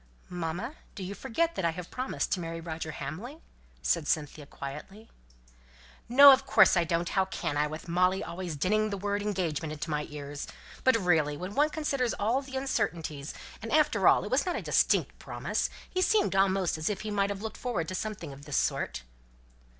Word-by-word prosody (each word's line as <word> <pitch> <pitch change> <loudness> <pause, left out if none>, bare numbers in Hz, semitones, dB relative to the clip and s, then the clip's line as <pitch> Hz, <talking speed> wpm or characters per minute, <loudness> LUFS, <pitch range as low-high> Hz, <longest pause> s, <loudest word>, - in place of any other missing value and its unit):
"Mamma, 180 - -4 0.2
do 195 - -6
you 185 +2 -4
forget 330 +11 -1
that 190 - -3
I 170 - +3
have 175 +1 -7
promised 255 +1 -2
to 185 - +1
marry 165 -1 -4
Roger 160 -1 -5
Hamley?" 220 - -6 0.5
said 165 -4 +1
Cynthia 150 -1 -1
quietly. 150 +13 -9 1.0
"No! 280 +3 +10
of 265 0 +4
course 270 - +5
I 175 - +4
don't 170 +1 -1
how 190 -1 +2
can 185 -5 -3
I, 150 +1 +2
with 155 +2 -7
Molly 180 +2 +2
always 175 -2 -5
dinning 215 +8 +1
the 200 - -3
word 205 +1 -1
'engagement' 170 -7 -2
into 155 +1 -5
my 150 0 -1
ears? 145 -1 -6 0.4
But 260 -3 +5
really, 160 -7 +2
when 185 +4 -6
one 295 +6 +3
considers 275 -6 -1
all 230 +6 +1
the 265 -1 -6
uncertainties, 170 - -2 0.3
and 225 - -6
after 255 - +3
all - - +6
it 205 - -6
was 260 +2 +3
not 360 - -2
a - - -2
distinct - - +2
promise, - - -2 0.2
he 370 - -2
seemed 405 - +3
almost 190 -3 +2
as 155 - 0
if 205 -2 -3
he 215 - -4
might 200 -1 +1
have 200 +1 -4
looked 220 - -5
forward 220 -10 -2
to - - -4
something 185 -7 -4
of 140 +1 -13
this 145 - -1
sort." - - -1
190 Hz, 195 wpm, -29 LUFS, 160-225 Hz, 1.0 s, No